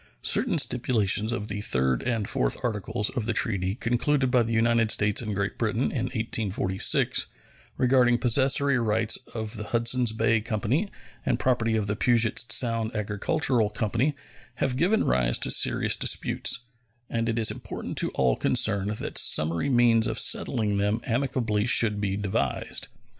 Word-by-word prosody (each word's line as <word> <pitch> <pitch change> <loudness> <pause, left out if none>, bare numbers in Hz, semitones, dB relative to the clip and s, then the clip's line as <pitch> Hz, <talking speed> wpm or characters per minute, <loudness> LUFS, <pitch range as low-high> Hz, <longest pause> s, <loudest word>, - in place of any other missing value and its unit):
Certain - - +1
stipulations 110 -3 +1
of 105 -3 -3
the 100 0 -4
third 65 - 0
and 115 -5 -2
fourth - - 0
articles 105 -2 -2
of 120 -4 -4
the 115 - 0
treaty 100 -4 0
concluded 130 +3 0
by 125 - +4
the 115 0 -2
United 115 0 +2
States 105 -1 +2
and 105 -3 -4
Great 100 +1 -3
Britain 115 +2 -1
in 125 -4 -2
1846, 105 -6 0 0.5
regarding 125 -1 +3
possessory 135 +2 +2
rights 110 -1 +1 0.2
of 110 0 -5
the 105 - -6
Hudsons 120 +1 +1
Bay 115 0 +1
Company 120 - -2 0.3
and - - 0
property 115 -3 0
of 110 -2 -1
the 100 +1 -2
Pugets 120 0 +2
Sound 115 -1 0
Agricultural 110 +3 0
Company, 115 +7 -1 0.4
have 130 -2 -1
given 185 +11 +1
rise - - +1
to - - 0
serious - - +2
disputes, 125 - +1 0.5
and 115 0 -2
it 115 - -2
is 110 -2 +2
important - - -7
to - - +1
all 65 -3 +2
concerned 105 -5 +1
that - - -3
summary 80 - +2
means 120 -2 +3
of 110 -1 -3
settling 105 -5 +1
them 105 +3 0
amicably 120 -4 -1
should 105 -4 +3
be 100 -1 -2
devised. 100 -2 -1
115 Hz, 155 wpm, -25 LUFS, 105-120 Hz, 0.5 s, by